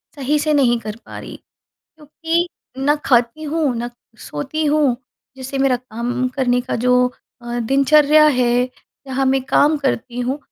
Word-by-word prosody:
सही 290 +1 0
से 305 +1 +1
नहीं 245 -5 +3
कर 215 -2 -6
पा - - -9
रही, - - -9 0.6
क्योंकि 325 +3 -2 0.3
ना 285 +2 +2
खाती 245 +3 +2
हूँ, 305 -3 0
ना 240 +1 -4 0.3
सोती 310 - -4
हूँ, 295 -4 +2 0.4
जिससे 265 +1 -5
मेरा 270 -2 +3
काम 245 +1 -3
करने 250 -2 +1
का 250 - -3
जो 250 +1 +3 0.4
अ, 240 0 -4
दिनचर्या 290 +5 +4
है, 250 -3 +2 0.4
जहाँ 265 0 -1
मैं 265 0 +2
काम 295 +3 +3
करती 255 -3 -2
हूँ, 255 +3 -2
265 Hz, 155 wpm, -19 LUFS, 245-295 Hz, 0.6 s, दिनचर्या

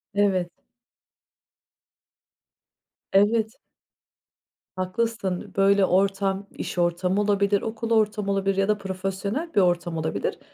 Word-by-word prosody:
Evet. 190 -3 +2 2.6
Evet. 220 +3 +3 1.2
Haklısın, 190 0 -2
böyle 195 0 +4
ortam, 195 +1 +1
iş - - -5
ortamı 180 +3 +1
olabilir, 200 -1 +2
okul 225 +1 -4
ortamı 210 -2 +1
olabilir 195 0 0
ya 195 - +2
da 210 0 +2
profesyonel 195 - -4
bir 200 - +4
ortam 175 -2 +1
olabilir. 160 0 -2
195 Hz, 95 wpm, -25 LUFS, 185-210 Hz, 2.6 s, böyle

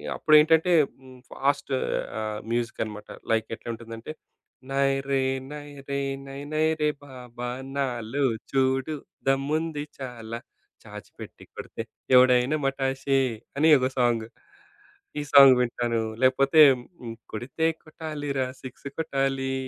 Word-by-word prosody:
అప్పుడు 155 - +4
ఏంటంటే 160 +3 +4 0.3
హ్మ్ 130 -1 -14
ఫాస్టు 140 0 -1 0.5
ఆహ్, 110 -1 -3
మ్యూజికన్నమాట. 110 -3 -3 0.2
లైక్ 110 0 +1
ఎట్లా 120 - -10
ఉంటుందంటే 115 +3 -8 0.6
నైరే 135 0 +1 0.3
నైరే 145 -2 -6 0.3
నై 135 0 -7
నైరే 155 0 +1 0.2
బాబా 125 -3 -8 0.3
నాలో 130 -1 -2 0.3
చూడు 135 +2 +1 0.3
దమ్ముంది 145 +3 0 0.2
చాలా 115 -3 -6 0.5
చాచిపెట్టి - - -11
కొడితే - - -7 0.3
ఎవడైనా 125 +2 +5
మాటశే 135 0 0 0.4
అని 155 +3 +4
ఏదో 130 -2 +2
సాంగ్. 120 -3 +2 0.9
ఈ - - -1
సాంగ్ 135 -2 +10
వింటాను, 120 -1 -1 0.2
లేకపోతే 135 +4 +5 0.7
కొడితే 125 +8 -3 0.2
కొట్టాలిరా 145 -4 -4 0.2
సిక్స్ 130 +2 -9
కొట్టాలి 135 -3 -1
135 Hz, 100 wpm, -26 LUFS, 125-145 Hz, 0.9 s, సాంగ్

